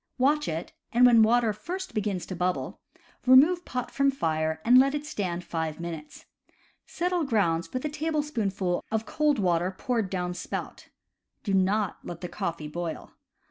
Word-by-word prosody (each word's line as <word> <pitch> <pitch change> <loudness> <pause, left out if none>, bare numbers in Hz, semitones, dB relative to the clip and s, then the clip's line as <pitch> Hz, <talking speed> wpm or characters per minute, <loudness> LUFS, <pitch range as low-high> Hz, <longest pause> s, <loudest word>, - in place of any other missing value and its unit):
Watch 290 +4 +2
it, 160 +1 -4 0.2
and 245 +1 +5
when 235 -2 +7
water 225 0 +4
first 370 - -6
begins 200 -4 -2
to 185 - -6
bubble, 180 +1 -2 0.5
remove 310 +8 +6
pot 250 -1 -4
from 275 0 +2
fire 160 -10 -1
and 250 +2 +7
let 275 +2 +3
it 295 0 -4
stand 180 - -3
five 160 -2 -3
minutes. 165 -3 -7 0.6
Settle 355 0 -1
grounds 170 - 0
with 255 +3 -3
a - - 0
tablespoonful 275 - -1
of 220 0 -1
cold 300 +4 +1
water 175 -2 +1
poured 230 -6 -1
down 180 -1 -2
spout. - - -6 0.5
Do 200 - -1
not 195 +1 +1
let 170 -1 -8
the 180 - -5
coffee 165 -2 -4
boil. 170 +1 -5
210 Hz, 160 wpm, -27 LUFS, 175-270 Hz, 0.6 s, when